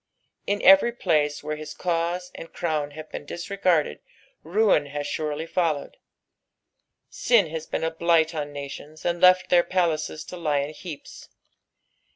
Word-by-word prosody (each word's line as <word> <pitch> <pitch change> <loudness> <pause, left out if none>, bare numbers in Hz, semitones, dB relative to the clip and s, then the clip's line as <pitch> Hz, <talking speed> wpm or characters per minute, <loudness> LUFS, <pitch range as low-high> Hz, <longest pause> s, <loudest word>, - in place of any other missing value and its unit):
In 205 +1 -1
every 195 +5 +7
place 150 -10 0
where 155 0 -3
lii^ 150 0 -9
cause 175 +1 -1
and 165 - -10
crown 155 -4 -2
have 155 0 -9
been - - -6
disregarded 175 - 0 0.4
ruin 180 -4 +2
has 145 0 -4
surely 150 +1 -3
followed: 165 -4 -1 1.1
sin 205 -10 +2
has 160 0 -5
been - - -3
a 160 - 0
blight 165 0 +2
on 150 -2 -4
nations, 145 +2 -9
and 175 0 -1
left 185 0 +6
their 175 -1 +6
palaces 155 -4 -1
to 180 - -9
lie 150 -4 0
in 145 +2 -5
heaps. 155 -2 -10
160 Hz, 150 wpm, -25 LUFS, 150-180 Hz, 1.1 s, every